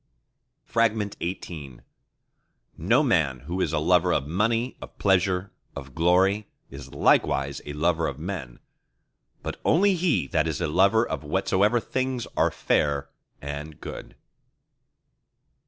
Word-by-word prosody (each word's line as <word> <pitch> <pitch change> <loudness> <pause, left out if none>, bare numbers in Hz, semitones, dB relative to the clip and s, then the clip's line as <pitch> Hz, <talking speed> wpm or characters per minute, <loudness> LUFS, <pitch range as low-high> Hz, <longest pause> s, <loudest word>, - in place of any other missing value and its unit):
XVIII 95 - -2 0.9
No - - +2
man 65 -2 +1
who 85 +7 -4
is - - 0
a - - 0
lover 90 +3 +3
of 70 - +1
money, 115 - 0
of - - -11
pleasure, 95 -1 +1 0.2
of 70 -1 -8
glory, 95 +6 +2 0.2
is 70 0 -10
likewise 70 0 +2
a 75 - -5
lover 80 +2 +1
of 70 - -5
Men; 80 -7 -6 0.9
but - - -6
only 195 +5 +4
he 170 - +1
that 80 -1 +1
is 80 -1 -2
a 85 - 0
lover 100 +8 +3
of - - -4
whatsoever 95 +8 +2
things 130 0 -2
are - - +3
fair 70 -1 0 0.3
and 75 +2 -6
good. - - -9
90 Hz, 125 wpm, -25 LUFS, 75-105 Hz, 0.9 s, only